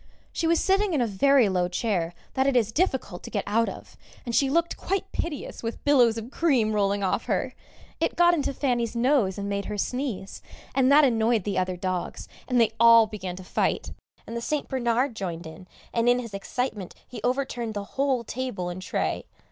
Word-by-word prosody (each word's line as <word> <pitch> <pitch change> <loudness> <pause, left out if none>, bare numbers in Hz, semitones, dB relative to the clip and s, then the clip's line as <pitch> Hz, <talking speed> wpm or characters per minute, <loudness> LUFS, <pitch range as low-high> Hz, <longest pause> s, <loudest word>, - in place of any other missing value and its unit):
She 330 - 0
was 335 0 +3
sitting 390 -2 +2
in 275 - +2
a - - +3
very 245 +4 +4
low 180 -2 +1
chair 180 -3 -1 0.2
that 265 0 +1
it 275 - +2
is 225 -3 +2
difficult 265 - -1
to - - -9
get 205 - -2
out 230 +3 +1
of, - - -11 0.3
and 240 - -4
she 275 - +3
looked 335 +4 +1
quite 390 +1 -3
piteous 310 -5 -4
with 230 0 -5
billows 245 -6 +4
of 225 +3 -6
cream 255 -11 +2
rolling 200 -1 +1
off 185 - 0
her; - - -1 0.5
it - - 0
got 345 0 +5
into 295 -5 0
Fanny's 245 -4 -1
nose 235 -6 +2
and 200 0 -3
made 200 0 -2
her 210 - -4
sneeze, 250 -3 -3 0.3
and 265 0 +3
that 295 +1 +7
annoyed 225 -3 +2
the 200 -1 -1
other 185 0 -1
dogs, 185 0 -3 0.2
and 250 -2 +2
they 225 -2 +4
all 230 -1 +8
began 190 -4 -6
to 185 - -9
fight, - - -1 0.3
and 230 - -7
the 235 - -3
St. 295 +4 -2
Bernard 250 0 0
joined 175 -4 -5
in, 160 +3 -11 0.3
and 235 +1 +2
in 245 - +4
his 230 -4 -6
excitement 205 -1 -4
he 250 - -8
overturned 245 -3 -1
the 205 - -3
whole 270 -3 +1
table 230 -7 -4
and 175 +1 -6
tray. - - -2
235 Hz, 205 wpm, -26 LUFS, 200-270 Hz, 0.5 s, all